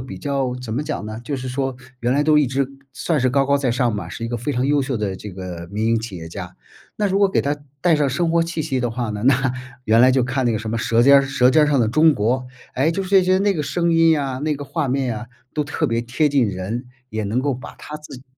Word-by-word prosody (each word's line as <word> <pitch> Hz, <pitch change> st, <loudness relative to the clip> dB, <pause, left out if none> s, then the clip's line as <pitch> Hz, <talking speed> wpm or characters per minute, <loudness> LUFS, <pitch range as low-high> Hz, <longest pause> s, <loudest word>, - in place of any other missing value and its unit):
比 125 Hz, -8 st, -8 dB
较 135 Hz, -1 st, -1 dB
怎 125 Hz, -3 st, -6 dB
么 140 Hz, -, -1 dB
讲 110 Hz, -7 st, -4 dB
呢？ 110 Hz, +1 st, -6 dB
就 140 Hz, +3 st, -3 dB
是 130 Hz, 0 st, -6 dB
说 135 Hz, 0 st, -2 dB, 0.2 s
原 120 Hz, +2 st, +1 dB
来 145 Hz, +2 st, +2 dB
都 155 Hz, 0 st, +4 dB
一 150 Hz, -, +5 dB
直 135 Hz, +1 st, -1 dB, 0.2 s
算 150 Hz, +3 st, -1 dB
是 130 Hz, 0 st, +2 dB
高 135 Hz, +1 st, +2 dB
高 140 Hz, +1 st, +3 dB
在 135 Hz, -3 st, 0 dB
上 120 Hz, -1 st, +1 dB
嘛， 105 Hz, -, -5 dB
是 115 Hz, -, -6 dB
一 115 Hz, -, -3 dB
个 120 Hz, -, -2 dB
非 120 Hz, +5 st, -3 dB
常 125 Hz, 0 st, 0 dB
优 145 Hz, 0 st, +2 dB
秀 130 Hz, -1 st, -2 dB
的 105 Hz, -3 st, -2 dB
这 100 Hz, +2 st, -8 dB
个 90 Hz, -2 st, -7 dB
民 105 Hz, +2 st, -1 dB
营 115 Hz, 0 st, +2 dB
企 110 Hz, -4 st, -7 dB
业 80 Hz, -1 st, -8 dB
家。 -, -, -8 dB, 0.4 s
那 210 Hz, -, +1 dB
如 195 Hz, +1 st, +1 dB
果 200 Hz, -, +5 dB
给 -, -, +1 dB
他 145 Hz, +1 st, -1 dB, 0.2 s
带 175 Hz, +1 st, +4 dB
上 150 Hz, -2 st, +2 dB
生 165 Hz, +6 st, 0 dB
活 170 Hz, 0 st, +4 dB
气 165 Hz, -1 st, -3 dB
息 140 Hz, -4 st, -1 dB
的 120 Hz, -1 st, -1 dB
话 120 Hz, -1 st, -3 dB
呢， 105 Hz, -1 st, -4 dB
那 130 Hz, -1 st, +3 dB, 0.3 s
原 110 Hz, +1 st, +4 dB
来 130 Hz, +1 st, +7 dB
就 130 Hz, -1 st, +2 dB
看 130 Hz, 0 st, -1 dB
那 120 Hz, -, +2 dB
个 110 Hz, -, 0 dB
什 110 Hz, +1 st, -6 dB
么 115 Hz, -, -1 dB
舌 115 Hz, +1 st, +2 dB
尖 140 Hz, +1 st, +7 dB
儿 -, -, +2 dB
舌 135 Hz, -2 st, +2 dB
尖 150 Hz, +4 st, +5 dB
儿 -, -, +4 dB
上 145 Hz, -2 st, +2 dB
的 115 Hz, -, +3 dB
中 155 Hz, +7 st, +4 dB
国， 125 Hz, +3 st, -1 dB, 0.3 s
哎， 140 Hz, +6 st, +2 dB
就 180 Hz, -, -2 dB
是 -, -, -7 dB
这 195 Hz, -2 st, +6 dB
些 185 Hz, +1 st, +3 dB
那 200 Hz, 0 st, +2 dB
个 150 Hz, -, -1 dB
声 170 Hz, +3 st, 0 dB
音 165 Hz, -2 st, +4 dB
啊、 135 Hz, -2 st, -3 dB
那 155 Hz, +1 st, 0 dB
个 145 Hz, -, -7 dB
画 145 Hz, +1 st, -2 dB
面 130 Hz, -3 st, -1 dB
啊， 115 Hz, -, -7 dB, 0.3 s
都 150 Hz, -, +1 dB
特 145 Hz, -, -2 dB
别 115 Hz, 0 st, 0 dB
贴 125 Hz, +6 st, +1 dB
近 140 Hz, -3 st, +3 dB
人， 100 Hz, +6 st, -4 dB, 0.2 s
也 110 Hz, -1 st, -3 dB
能 105 Hz, +5 st, -1 dB
够 140 Hz, 0 st, 0 dB
把 125 Hz, -, -10 dB
他 150 Hz, -, -8 dB
自 150 Hz, -3 st, -11 dB
己 125 Hz, -, -14 dB
130 Hz, 315 characters per minute, -21 LUFS, 115-150 Hz, 0.4 s, 来